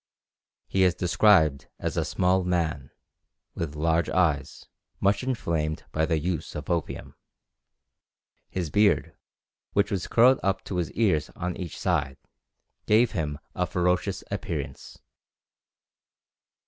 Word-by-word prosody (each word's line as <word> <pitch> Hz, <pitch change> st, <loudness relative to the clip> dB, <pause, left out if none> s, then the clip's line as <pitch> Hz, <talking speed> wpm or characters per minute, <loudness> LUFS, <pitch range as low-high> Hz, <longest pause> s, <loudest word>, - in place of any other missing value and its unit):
He 95 Hz, -, 0 dB
is 90 Hz, -2 st, +4 dB
described 85 Hz, -5 st, +3 dB
as -, -, -3 dB
a -, -, +1 dB
small 90 Hz, +1 st, +1 dB
man, 80 Hz, -6 st, -1 dB, 0.6 s
with 75 Hz, -3 st, -4 dB
large 80 Hz, +2 st, +1 dB
eyes, 75 Hz, -7 st, 0 dB, 0.3 s
much 100 Hz, +1 st, +2 dB
inflamed 85 Hz, -12 st, -2 dB
by 80 Hz, 0 st, 0 dB
the 80 Hz, -2 st, +1 dB
use 80 Hz, 0 st, -3 dB
of 75 Hz, +3 st, -4 dB
opium. 85 Hz, -2 st, -3 dB, 1.4 s
His 85 Hz, -5 st, -3 dB
beard, 105 Hz, 0 st, +2 dB, 0.6 s
which 100 Hz, -, +2 dB
was 95 Hz, -4 st, -2 dB
curled 125 Hz, +3 st, +5 dB
up 95 Hz, 0 st, 0 dB
to 95 Hz, -, -4 dB
his 85 Hz, -3 st, -1 dB
ears 80 Hz, -10 st, +1 dB
on 90 Hz, -1 st, -3 dB
each 85 Hz, -4 st, -6 dB
side, 80 Hz, -6 st, 0 dB, 0.7 s
gave 110 Hz, +2 st, +4 dB
him 75 Hz, -7 st, -2 dB, 0.2 s
a -, -, -1 dB
ferocious 90 Hz, +2 st, 0 dB
appearance. 75 Hz, -8 st, -5 dB
85 Hz, 120 wpm, -26 LUFS, 75-95 Hz, 1.4 s, curled